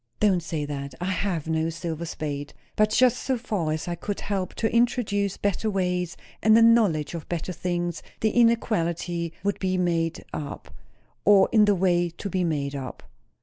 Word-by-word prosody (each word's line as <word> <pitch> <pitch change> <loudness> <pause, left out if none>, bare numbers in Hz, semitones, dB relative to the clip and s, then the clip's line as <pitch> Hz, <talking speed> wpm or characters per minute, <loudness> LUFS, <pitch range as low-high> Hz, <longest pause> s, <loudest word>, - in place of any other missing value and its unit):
"Don't 195 -4 +3
say 160 -3 -3
that! 140 -2 -5
I 180 +2 -1
have 180 -4 -2
no 160 0 0
silver 170 0 -4
spade. 145 -2 -5 0.2
But 215 0 +3
just 250 +1 +4
so 260 -1 0
far 205 -9 -2
as 155 +2 -3
I 175 - -1
could 200 +4 -4
help 195 -2 -3
to 225 0 -1
introduce 210 -5 +1
better 205 +2 0
ways 180 -3 -1 0.2
and 220 0 +6
a 230 - +6
knowledge 205 -11 +4
of 165 -2 -7
better 175 +1 -3
things, 175 -1 -2 0.2
the 220 - +2
inequality 175 -8 +1
would 200 0 -1
be 185 -1 0
made 170 -2 0
up 145 -2 -6 0.5
or 195 -2 +6
on 215 -2 +6
the 205 -1 +3
way 175 -1 +2
to 170 +4 -7
be 185 0 0
made 145 -4 -1
up." 135 -3 -6
180 Hz, 180 wpm, -25 LUFS, 165-205 Hz, 0.5 s, and